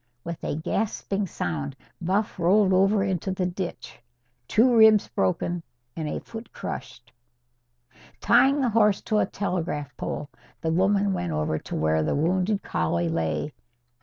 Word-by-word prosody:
With 170 Hz, -1 st, -6 dB
a -, -, -2 dB
gasping 195 Hz, +4 st, -2 dB
sound, 75 Hz, -, -4 dB, 0.3 s
Buff 200 Hz, +4 st, -1 dB
rolled 190 Hz, +3 st, +4 dB
over 195 Hz, +2 st, +3 dB
into 190 Hz, -1 st, -1 dB
the 185 Hz, -1 st, -1 dB
ditch, 180 Hz, 0 st, -5 dB, 0.5 s
two 240 Hz, +2 st, +4 dB
ribs 220 Hz, -2 st, +6 dB
broken 170 Hz, -, -1 dB, 0.3 s
and 155 Hz, -2 st, -3 dB
a -, -, -3 dB
foot 225 Hz, +1 st, -10 dB
crushed. 120 Hz, -1 st, -7 dB, 1.1 s
Tying 275 Hz, +1 st, +4 dB
the 255 Hz, -, +2 dB
horse 210 Hz, -2 st, +3 dB
to 215 Hz, -1 st, +1 dB
a -, -, +2 dB
telegraph 165 Hz, -8 st, -3 dB
pole, 150 Hz, -, -4 dB, 0.3 s
the 160 Hz, -, -1 dB
woman 195 Hz, +3 st, +2 dB
went 90 Hz, -, -2 dB
over 75 Hz, 0 st, -1 dB
to -, -, -7 dB
where 80 Hz, 0 st, +1 dB
the 75 Hz, -, 0 dB
wounded 185 Hz, +6 st, +1 dB
collie 85 Hz, +1 st, 0 dB
lay. 80 Hz, -, -2 dB
180 Hz, 145 wpm, -25 LUFS, 140-205 Hz, 1.1 s, ribs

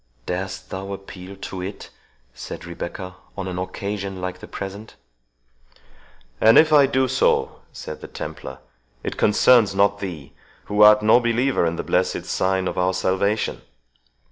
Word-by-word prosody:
"Darest 95 Hz, +1 st, -5 dB
thou 95 Hz, +1 st, -5 dB
appeal 95 Hz, -1 st, -9 dB
to 95 Hz, -1 st, -7 dB
it," 95 Hz, +2 st, -7 dB, 0.4 s
said -, -, -8 dB
Rebecca, 85 Hz, +2 st, -7 dB, 0.2 s
"on 95 Hz, -1 st, -4 dB
an 90 Hz, -1 st, -4 dB
occasion 95 Hz, +1 st, -4 dB
like 90 Hz, 0 st, -5 dB
the -, -, -10 dB
present?" 100 Hz, +3 st, -7 dB, 1.5 s
"And 110 Hz, +1 st, +7 dB
if 155 Hz, 0 st, +6 dB
I 145 Hz, -2 st, +7 dB
do 130 Hz, -1 st, +1 dB
so," 130 Hz, +1 st, +1 dB
said 75 Hz, -, -8 dB
the -, -, -8 dB
Templar, -, -, -7 dB, 0.5 s
"it -, -, -3 dB
concerns 105 Hz, -1 st, +4 dB
not 100 Hz, +1 st, +3 dB
thee, 85 Hz, -9 st, -7 dB, 0.3 s
who 105 Hz, 0 st, 0 dB
art 105 Hz, 0 st, +8 dB
no 110 Hz, +3 st, +6 dB
believer 120 Hz, -4 st, +1 dB
in 85 Hz, -, -2 dB
the -, -, -4 dB
blessed -, -, 0 dB
sign 95 Hz, 0 st, 0 dB
of -, -, -3 dB
our 90 Hz, +1 st, +1 dB
salvation." 95 Hz, +3 st, 0 dB
95 Hz, 150 wpm, -22 LUFS, 95-105 Hz, 1.5 s, art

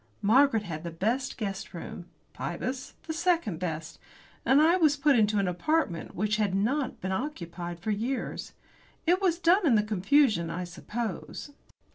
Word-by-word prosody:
Margaret 235 Hz, +1 st, +4 dB
had 160 Hz, -5 st, -6 dB
the 170 Hz, -, -4 dB
best 225 Hz, +11 st, -1 dB
guest 195 Hz, -5 st, -4 dB
room, 175 Hz, +1 st, -7 dB, 0.3 s
Pybus 250 Hz, +9 st, -4 dB
the 320 Hz, -, -4 dB
second 330 Hz, -, +1 dB
best, 165 Hz, -2 st, -4 dB, 0.4 s
and 265 Hz, +2 st, +5 dB
I 325 Hz, +3 st, +5 dB
was 310 Hz, -5 st, +3 dB
put 285 Hz, -1 st, +4 dB
into 215 Hz, -2 st, +3 dB
an 195 Hz, -2 st, +2 dB
apartment 180 Hz, -, -1 dB
which 210 Hz, +2 st, 0 dB
had 205 Hz, -3 st, +1 dB
not 255 Hz, +7 st, 0 dB
been 190 Hz, -, -3 dB
occupied 175 Hz, -, -4 dB
for 215 Hz, +5 st, -2 dB
years. 235 Hz, +6 st, -3 dB, 0.5 s
It 355 Hz, +3 st, +3 dB
was 355 Hz, -3 st, +2 dB
done 360 Hz, +3 st, +4 dB
in 275 Hz, -9 st, +4 dB
the 210 Hz, -, +4 dB
confusion, 210 Hz, -, +2 dB
I 180 Hz, +2 st, -3 dB
suppose. 205 Hz, -, -5 dB
215 Hz, 160 wpm, -28 LUFS, 180-285 Hz, 0.5 s, and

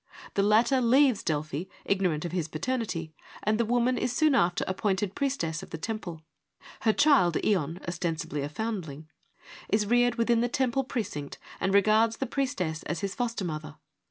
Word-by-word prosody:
The 200 Hz, -, +2 dB
latter 230 Hz, +6 st, +4 dB
leaves 255 Hz, 0 st, +4 dB
Delphi, 155 Hz, +1 st, -2 dB, 0.2 s
ignorant 180 Hz, -5 st, 0 dB
of 170 Hz, -, -4 dB
his 175 Hz, -3 st, -1 dB
paternity, 165 Hz, -2 st, -3 dB, 0.3 s
and 215 Hz, +1 st, +1 dB
the 235 Hz, -, +2 dB
woman 245 Hz, +2 st, +1 dB
is 250 Hz, -, 0 dB
soon 305 Hz, +3 st, +3 dB
after 175 Hz, -8 st, +2 dB
appointed 190 Hz, 0 st, -1 dB
priestess 205 Hz, -, -1 dB
of -, -, -10 dB
the -, -, -5 dB
temple. 175 Hz, -4 st, -5 dB, 0.6 s
Her 220 Hz, -, +3 dB
child, 215 Hz, -, +4 dB
Ion, 175 Hz, -4 st, 0 dB
ostensibily 165 Hz, -4 st, -3 dB
a 140 Hz, -, -3 dB
foundling, 160 Hz, -5 st, -5 dB, 0.6 s
is 210 Hz, +1 st, +2 dB
reared 245 Hz, +2 st, +3 dB
within 235 Hz, 0 st, +2 dB
the 240 Hz, -, +1 dB
temple 265 Hz, 0 st, +1 dB
precinct 200 Hz, -, -4 dB, 0.2 s
and 190 Hz, -, 0 dB
regards 215 Hz, +3 st, +4 dB
the 270 Hz, -, -2 dB
priestess 185 Hz, -, -2 dB
as 170 Hz, -2 st, -4 dB
his 200 Hz, -1 st, -2 dB
foster 235 Hz, -5 st, -2 dB
mother. 155 Hz, -2 st, -5 dB
200 Hz, 165 wpm, -28 LUFS, 165-240 Hz, 0.6 s, latter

